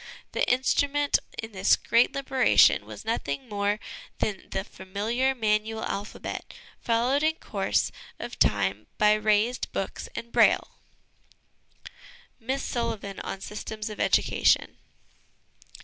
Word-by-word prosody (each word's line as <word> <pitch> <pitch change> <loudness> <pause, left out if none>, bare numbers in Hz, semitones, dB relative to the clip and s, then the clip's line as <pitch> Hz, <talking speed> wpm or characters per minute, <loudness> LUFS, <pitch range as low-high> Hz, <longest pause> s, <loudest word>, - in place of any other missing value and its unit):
The - - 0
instru 260 +3 +2
ment 290 0 +2 0.2
in 225 0 -6
this 195 -1 +4
great 230 +2 +2
liberation 265 -2 +4
was - - -9
nothing 220 - -2
more 205 -1 -1 0.4
than 200 -3 -3
the 190 - -2
familiar 215 +8 -2
manual 220 -1 0
alphabet, 200 +2 -5 0.2
followed 240 +5 +1
in 315 +1 +2
course 195 -10 -1 0.3
of - - -7
time 100 0 +1
by 210 0 +5
raised 215 +3 +1
books - - -4
and - - -4
c 235 - -27
Braille.' - - +4 1.7
Miss 260 +4 -2
Sullivan 210 -5 -3
on 195 - -5
Systems 215 +1 -6
of 210 - -9
Education. - - +2
220 Hz, 120 wpm, -27 LUFS, 200-245 Hz, 1.7 s, by